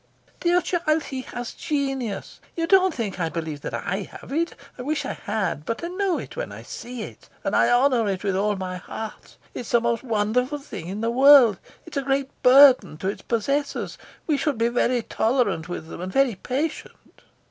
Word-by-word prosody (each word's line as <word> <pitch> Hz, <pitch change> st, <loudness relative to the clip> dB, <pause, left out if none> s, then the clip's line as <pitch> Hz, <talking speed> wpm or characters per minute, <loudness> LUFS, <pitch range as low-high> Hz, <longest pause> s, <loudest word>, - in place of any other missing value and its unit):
"Dear 350 Hz, +1 st, +3 dB
child, 320 Hz, -4 st, 0 dB
he 265 Hz, -2 st, -5 dB
has 245 Hz, -2 st, -6 dB
genius. 270 Hz, -9 st, -3 dB, 0.2 s
You 330 Hz, -, 0 dB
don't 375 Hz, +1 st, +5 dB
think 215 Hz, -, -4 dB
I 165 Hz, -2 st, 0 dB
believe 160 Hz, -3 st, -5 dB
that -, -, -4 dB
I -, -, -2 dB, 0.2 s
have -, -, -13 dB
it. 335 Hz, +3 st, 0 dB, 0.2 s
I -, -, -8 dB
wish 295 Hz, +2 st, -2 dB
I -, -, -2 dB
had; 190 Hz, -8 st, -2 dB
but 230 Hz, -, -4 dB
I 340 Hz, -, -2 dB
know 370 Hz, -1 st, 0 dB
it -, -, -8 dB
when -, -, -4 dB
I -, -, -9 dB
see 245 Hz, -1 st, -7 dB
it, -, -, -11 dB
and -, -, 0 dB
I -, -, +4 dB
honour 245 Hz, -3 st, +3 dB
it 190 Hz, 0 st, -3 dB
with 195 Hz, -2 st, 0 dB
all 205 Hz, +2 st, +1 dB
my 185 Hz, -1 st, -4 dB
heart. 220 Hz, +4 st, -8 dB, 0.2 s
It's 240 Hz, -, -6 dB
the 235 Hz, -, +4 dB
most 235 Hz, -1 st, 0 dB
wonderful 245 Hz, +4 st, 0 dB
thing 205 Hz, -, -8 dB
in 200 Hz, +4 st, -4 dB
the 230 Hz, +1 st, 0 dB
world. 260 Hz, -5 st, +7 dB, 0.3 s
It's 330 Hz, -3 st, -7 dB
a -, -, +2 dB
great 270 Hz, 0 st, -1 dB
burden 250 Hz, -, +7 dB
to 190 Hz, -, -2 dB
its 200 Hz, -, -5 dB
possessors. 275 Hz, +5 st, -2 dB, 0.3 s
We 300 Hz, -3 st, +1 dB
should 280 Hz, -2 st, 0 dB
be 230 Hz, +1 st, +2 dB
very 245 Hz, 0 st, +1 dB
tolerant 220 Hz, -10 st, 0 dB
with 160 Hz, -2 st, -5 dB
them, -, -, -7 dB
and 185 Hz, +1 st, -4 dB
very 270 Hz, -1 st, +3 dB
patient." 275 Hz, -, -5 dB
245 Hz, 200 wpm, -24 LUFS, 205-285 Hz, 0.3 s, world